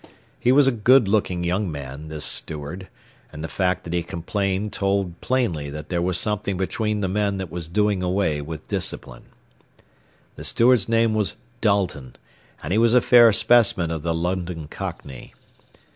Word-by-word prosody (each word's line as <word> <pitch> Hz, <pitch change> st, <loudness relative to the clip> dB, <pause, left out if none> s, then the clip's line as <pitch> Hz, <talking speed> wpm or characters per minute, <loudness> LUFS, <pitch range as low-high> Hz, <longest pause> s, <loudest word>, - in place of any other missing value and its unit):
He 125 Hz, -, +2 dB
was 140 Hz, +1 st, +5 dB
a 135 Hz, -, +4 dB
good 120 Hz, +1 st, +4 dB
looking 95 Hz, -4 st, 0 dB
young 90 Hz, +2 st, -1 dB
man, 70 Hz, +1 st, -8 dB
this 75 Hz, -1 st, -2 dB
steward, 80 Hz, +5 st, -2 dB, 0.4 s
and 75 Hz, 0 st, -8 dB
the -, -, -3 dB
fact 90 Hz, 0 st, -1 dB
that 85 Hz, -, -6 dB
he 85 Hz, -, 0 dB
complained 95 Hz, +4 st, -3 dB
told 95 Hz, -3 st, -1 dB
plainly 105 Hz, -, -1 dB
that 75 Hz, +1 st, -8 dB
there 85 Hz, -2 st, -1 dB
was 90 Hz, 0 st, 0 dB
something 105 Hz, -2 st, -1 dB
between 105 Hz, +3 st, -2 dB
the 95 Hz, -, 0 dB
men 100 Hz, +1 st, -1 dB
that 95 Hz, -4 st, -6 dB
was 85 Hz, -1 st, -5 dB
doing 105 Hz, +2 st, 0 dB
away 90 Hz, -5 st, 0 dB
with 80 Hz, +1 st, -8 dB
discipline. -, -, -4 dB, 1.1 s
The -, -, -8 dB
steward's 115 Hz, -3 st, +3 dB
name 115 Hz, -1 st, +2 dB
was 105 Hz, -2 st, 0 dB, 0.3 s
Dalton, 95 Hz, -, -1 dB, 0.5 s
and 75 Hz, +5 st, -3 dB
he 110 Hz, -, +3 dB
was 115 Hz, +1 st, +4 dB
a -, -, +7 dB
fair 120 Hz, -2 st, +6 dB
specimen 105 Hz, -5 st, +4 dB
of 80 Hz, -2 st, -4 dB
the 85 Hz, +1 st, -2 dB
London 90 Hz, -2 st, -3 dB
cockney. 65 Hz, -3 st, -8 dB
95 Hz, 170 wpm, -22 LUFS, 80-105 Hz, 1.1 s, a